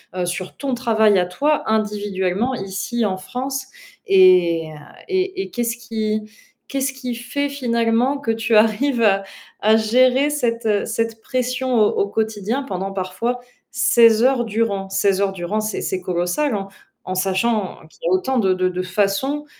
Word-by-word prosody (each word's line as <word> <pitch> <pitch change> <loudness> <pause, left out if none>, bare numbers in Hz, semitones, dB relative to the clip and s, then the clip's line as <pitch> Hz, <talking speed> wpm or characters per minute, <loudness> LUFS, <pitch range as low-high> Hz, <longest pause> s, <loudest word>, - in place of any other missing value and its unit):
heu, 180 -1 -1
sur 175 +1 -4
ton 270 -3 -2
travail 220 -5 +3
à 180 - +1
toi 290 +12 0
individuellement 205 +1 -1
ici 200 +4 -3
en 190 -2 -1
France 260 +7 -4 0.4
et 365 - +5 0.4
et 380 0 -1
et - - -6
qu'est-ce 235 -1 -1
qui 220 -2 -2 0.5
qu'est-ce 270 -1 -1
qui 250 -3 -5
fait 285 +4 -3
finalement 245 0 0
que 240 - -5
tu 225 0 0
arrives 230 +4 +3
à 195 -2 +3 0.4
à 215 +1 +5
gérer 255 +5 +3
cette, 235 -6 -1
heu, 205 -1 +1
cette 225 0 -2
pression 255 0 -1
au 210 - +5
au 200 - 0
quotidien 220 +4 -2
pendant 195 -5 -4
parfois 195 +6 -2 0.3
16 230 -2 +4
heures 255 -2 +3
durant? 205 -3 -1
16 195 0 +1
heures 195 -1 +1
durant, 190 +4 -2
c'est 215 0 -3
c'est 185 - -2
colossal 180 +9 -1
en 195 -1 -4 0.4
en 185 - -3
sachant 190 +2 0
qu'il - - -24
y - - -1
a - - +1
autant 265 -9 +1
de 190 -3 +3
de 185 0 0
de 185 0 -3
façons 205 +10 -1
225 Hz, 165 wpm, -20 LUFS, 195-255 Hz, 0.5 s, et